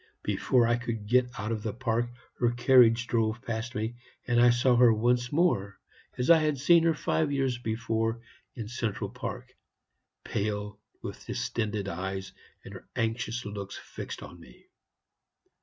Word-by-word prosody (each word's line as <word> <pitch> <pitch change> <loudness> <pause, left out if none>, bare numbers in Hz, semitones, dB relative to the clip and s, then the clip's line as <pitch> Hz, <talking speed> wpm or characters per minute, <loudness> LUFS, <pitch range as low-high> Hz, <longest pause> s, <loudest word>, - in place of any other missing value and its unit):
Before 125 -3 +2
I 120 +1 +2
could 115 -3 -4
get 125 +3 +3
out 110 +1 -3
of 110 -2 -2
the 110 -1 -4
park 120 -1 0 0.3
her 120 - +3
carriage 120 -1 +5
drove 115 -1 0
past 115 +1 -4
me, 110 +3 -3 0.3
and 120 -1 +3
I 120 - +7
saw 120 +1 +3
her 120 -1 +7
once 120 +2 +1
more 145 - +1 0.4
as 125 +6 +3
I 165 - +8
had 155 -2 +1
seen 165 +5 +5
her 165 -1 +3
five 155 -1 0
years 135 -3 0
before 115 0 -1 0.4
in 115 -4 -5
Central 115 -2 -3
Park, - - -7 0.7
pale, 105 0 -3 0.2
with - - -8
distended 105 -3 -2
eyes, 95 +1 -4 0.3
and - - -9
her - - -12
anxious 115 +1 -2
looks 100 -1 -6
fixed - - -8
upon 85 - -11
me. 65 -7 -17
115 Hz, 155 wpm, -28 LUFS, 110-125 Hz, 0.7 s, I